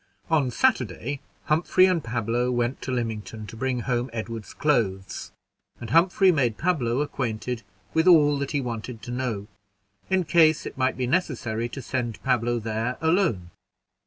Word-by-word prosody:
On 145 -5 +3
Saturday, 135 - 0 0.2
Humphrey 170 +4 +4
and 180 -4 +1
Pablo 120 +1 -1
went 120 +1 -1
to 130 - -4
Lymington, 110 -3 -3
to 110 - -10
bring 125 +1 -1
home 125 0 -1
Edward's 115 -1 -5
clothes, 100 -10 -1 0.5
and 115 -2 -7
Humphrey 185 +4 +5
made 125 -9 +1
Pablo 140 -8 +1
acquainted 125 -4 -3 0.3
with 160 +2 +2
all 150 -5 +6
that 140 - -2
he 145 - 0
wanted 115 -2 -5
to 120 - -6
know, 120 -5 -2 0.6
in 190 -1 +2
case 160 -1 +4
it - - -6
might 130 0 0
be 130 - 0
necessary 120 -7 -1
to 135 +1 -7
send 120 -3 -3
Pablo 120 -2 +1
there 115 +2 -2
alone. 160 - +1
125 Hz, 155 wpm, -25 LUFS, 115-150 Hz, 0.6 s, all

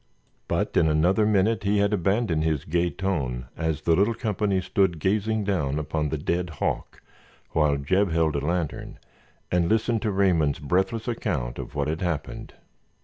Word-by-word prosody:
But - - -1
in 80 - +4
another 90 +8 +3
minute 105 +1 +2
he 100 +1 +1
had 100 +1 +2
abandoned 95 -3 +1
his 80 -2 -1
gay 85 +2 +1
tone 70 -11 -2
as 80 -2 -2
the 85 - +3
little 105 +6 +2
company 105 -4 0
stood 95 -1 +1
gazing 105 +5 0
down 75 -9 0
upon 75 0 -2
the 80 - -2
dead 85 +4 -1
hawk, 80 - -3 0.5
while 75 -2 +2
Jeb 95 +8 +1
held 80 -2 +1
a 70 - -1
lantern, 85 0 -3 0.5
and 90 -1 +2
listened 110 0 +1
to 110 - 0
Raymond's 90 -7 +2
breathless 95 - -1
account 75 - -2
of - - -7
what 70 -1 0
had 80 +1 -2
happened. 85 -5 -4
90 Hz, 165 wpm, -25 LUFS, 75-100 Hz, 0.5 s, in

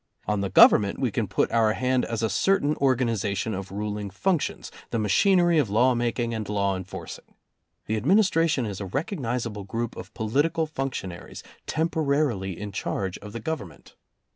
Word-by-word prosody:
On 105 -1 0
the 100 - -1
Government 100 +1 +6
we 130 -4 0
can 110 0 -1
put 95 - 0
our 110 -2 +3
hand 130 +1 +1
as 115 -1 -3
a 110 - +2
certain 155 - +2
organization 115 -6 0
of 95 0 -6
ruling 105 0 -4
functions, 165 - -1 0.2
the - - -2
machinery 175 - +3
of 130 -8 +1
law 120 +5 +4
making 120 0 -1
and 110 -2 -4
law 100 -2 0
enforcing. 95 0 -8 0.5
The 110 0 -1
Administra 170 - +3
tion 130 -5 0
is 100 -2 -5
a 100 - -4
recognizable 120 - -3
group 115 +4 -4
of - - -9
political 145 +9 +1
function 135 -10 -4
aries, 85 - -10 0.2
temporarily 140 - 0
in 105 0 -5
charge 95 -1 -3
of 105 0 -10
the 115 - -6
government. 115 - -6
115 Hz, 165 wpm, -25 LUFS, 100-140 Hz, 0.5 s, Government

